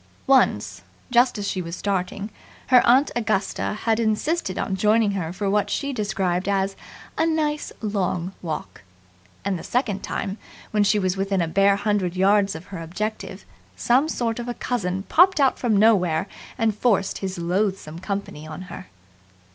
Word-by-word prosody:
Once, 105 - +2 0.3
just 245 0 +4
as 205 -1 -3
she 185 - -2
was 170 0 -5
starting, 200 +2 -2 0.4
her 250 -1 +7
aunt 260 +4 +5
Augusta 215 -2 -1
had 225 -1 +2
insisted 220 - 0
on 190 - -1
joining 210 +2 +3
her 180 -5 -3
for 200 +3 -3
what 205 +1 +1
she 280 -1 -2
described 195 -4 -1
as 195 0 0 0.4
"a 320 - +4
nice 305 -2 -1
long 190 -3 -1
walk"; 160 - -5 0.6
and 195 -3 -1
the - - -9
second 220 -6 -1
time, 195 +2 -4 0.3
when 210 -1 +3
she 205 +1 +3
was 185 -2 0
within 195 0 0
a 170 - +1
bare 195 +4 +3
hundred 200 -3 0
yards 195 +1 +3
of 160 +2 -8
her 175 - -5
objective, 210 +7 -5 0.3
some 265 +6 +2
sort 235 -5 -2
of 240 - -5
a 240 - -3
cousin 190 -6 -2
popped 360 - +4
out 270 -2 +3
from 225 -5 +2
nowhere 190 -6 +3 0.3
and 225 -3 +2
forced 210 -4 +1
his 190 -1 -4
loathsome 175 -2 -1
company 185 -5 -5
on 155 +3 -7
her. - - -9
200 Hz, 165 wpm, -23 LUFS, 185-225 Hz, 0.6 s, her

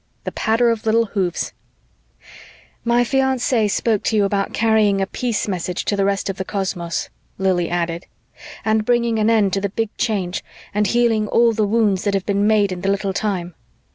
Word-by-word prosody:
The - - -4
patter 230 +2 +2
of 225 -1 -3
little 230 +1 +3
hoofs... 190 -4 -2 1.3
"My 240 +1 +3
fiance 260 -3 +1
spoke 215 +1 0
to 225 - +1
you 205 -2 +3
about 195 0 -1
carrying 220 -3 +2
a 195 - +1
peace 230 +2 -2
message 180 -2 -3
to 205 - 0
the 200 -1 +1
rest 200 -1 0
of 195 -1 -3
the 190 - -2
cosmos," 185 -4 -3 0.3
Lili 185 -3 +1
added, 170 0 -2 0.6
"and 220 0 +2
bringing 235 -1 +1
an 215 +1 +2
end 210 -4 +3
to 195 - 0
the 200 - -1
Big 225 +2 -3
Change, 195 -6 -1 0.3
and 210 0 +1
healing 230 -1 +2
all 230 +2 +3
the 215 -1 +1
wounds 210 -3 +2
that 200 -1 +1
have 195 - -1
been 200 0 +1
made 210 -2 +3
in 180 -1 -5
the 195 - 0
Little 195 0 0
Time." 185 -4 -2
205 Hz, 190 wpm, -20 LUFS, 195-225 Hz, 1.3 s, little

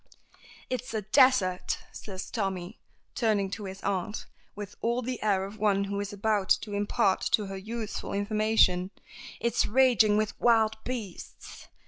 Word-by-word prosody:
"It's 250 -2 -4
a 215 - -1
desert," 215 -5 +3
says 190 -2 -8
Tommy, 190 -2 -3 0.3
turning 210 -5 +1
to 205 0 -5
his 190 0 -8
aunt, 200 +2 -2 0.3
with 205 -1 -7
all 235 +2 0
the 255 0 -4
air 195 -3 +1
of 200 +2 -10
one 200 -2 +2
who 200 0 -3
is 205 0 -4
about 205 -1 0
to 210 - -7
impart 200 -2 +1
to 210 - +3
her 195 0 -6
useful 220 +2 -5
information. 205 -3 +2 0.5
"It's 235 - +1
raging 225 -4 +4
with 215 -1 -2
wild 220 -2 +3
beasts. 225 -8 -7
210 Hz, 145 wpm, -28 LUFS, 195-225 Hz, 0.5 s, raging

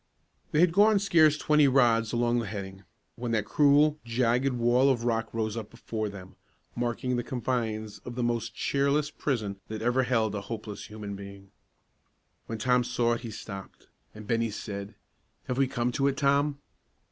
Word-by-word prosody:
They 150 - +3
had 175 -1 +5
gone 210 +2 +5
scarce 165 -6 +4
twenty 150 -1 +4
rods 120 -4 +3
along 120 0 +1
the 115 - -3
heading, 95 -2 -7 0.3
when 120 0 -4
that 110 -2 +1
cruel, 145 +3 +4
jagged 125 +3 +1
wall 120 +3 +3
of 120 -3 +1
rock 115 -2 0
rose 110 -1 -2
up 110 -3 -5
before 110 -2 -4
them, 95 -2 -11 0.4
marking 120 +1 -1
the 120 - -1
confines 115 -4 -3
of 120 - -8
the 125 - -1
most 115 -1 -1
cheerless 140 +2 +1
prison 110 -10 -2
that 110 0 -5
ever 120 +2 +2
held 115 -4 +1
a 100 - -3
hopeless 105 0 -7
human 105 -2 -7
being. 100 0 -11 1.0
When 115 - -4
Tom 125 +3 +2
saw 120 -1 +1
it 115 - -3
he 120 - -6
stopped, 100 -2 -9 0.3
and 110 0 -9
Bennie 115 +1 0
said, 100 -1 -6 0.5
"Have 125 +1 -3
we 135 - +4
come 125 -2 -1
to 135 +2 +1
it, 140 -1 0
Tom?" 140 0 +2
120 Hz, 175 wpm, -28 LUFS, 110-135 Hz, 1.0 s, had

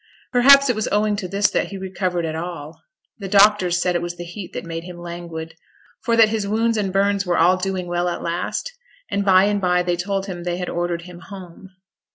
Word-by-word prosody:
Perhaps 275 +3 +7
it 245 - +1
was 215 - -2
owing 210 0 +2
to 195 -3 -4
this 200 +2 +1
that - - 0
he 195 - -7
recovered 185 -2 -2
at 160 - -3
all. 165 -2 -7 0.4
The 200 - -5
doctors 195 -3 +4
said 180 0 +1
it 175 - 0
was 175 0 -5
the 175 - -6
heat 175 +1 -8
that - - -5
made 165 0 -5
him 180 0 -9
languid, 170 -2 -7 0.5
for 230 - +1
that 225 -2 +6
his 215 -2 -2
wounds 225 +2 +1
and 200 -3 -1
burns 200 +1 +1
were 180 -2 0
all 180 +3 +5
doing 185 -1 -3
well 175 0 -1
at 175 - -5
last; 175 - -3 0.4
and 200 - 0
by 190 -1 +5
and 205 0 +1
by 180 -1 +2
they 175 0 0
told 195 +2 -2
him 180 -3 -6
they 175 0 -2
had 180 -1 -4
ordered 175 -1 -2
him 175 0 -11
'home'. 190 -1 -11
185 Hz, 225 wpm, -21 LUFS, 175-200 Hz, 0.5 s, Perhaps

